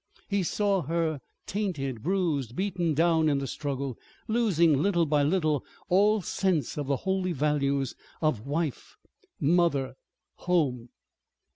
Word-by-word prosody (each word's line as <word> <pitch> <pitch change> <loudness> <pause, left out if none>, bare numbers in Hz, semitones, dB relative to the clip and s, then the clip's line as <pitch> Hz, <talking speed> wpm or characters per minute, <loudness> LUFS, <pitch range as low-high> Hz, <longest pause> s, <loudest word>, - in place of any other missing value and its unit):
He 200 -1 0
saw 200 +1 +1
her 160 0 -1 0.3
tainted, 150 - -3
bruised, 155 - -1
beaten 180 -4 0
down 160 0 +3
in 145 - +2
the 140 - -2
struggle, 140 -2 -4 0.3
losing 170 - +3
little 175 -2 +2
by 150 -1 +2
little 155 -2 +1 0.3
all 205 +2 +4
sense 170 -7 0
of 145 -2 -3
the 140 - +2
holy 190 -1 0
values 140 -2 0 0.3
of 145 -7 0
Wife, 150 -1 -3 0.4
Mother, 145 -5 +2 0.4
Home. 135 -10 0
160 Hz, 125 wpm, -28 LUFS, 140-185 Hz, 0.4 s, all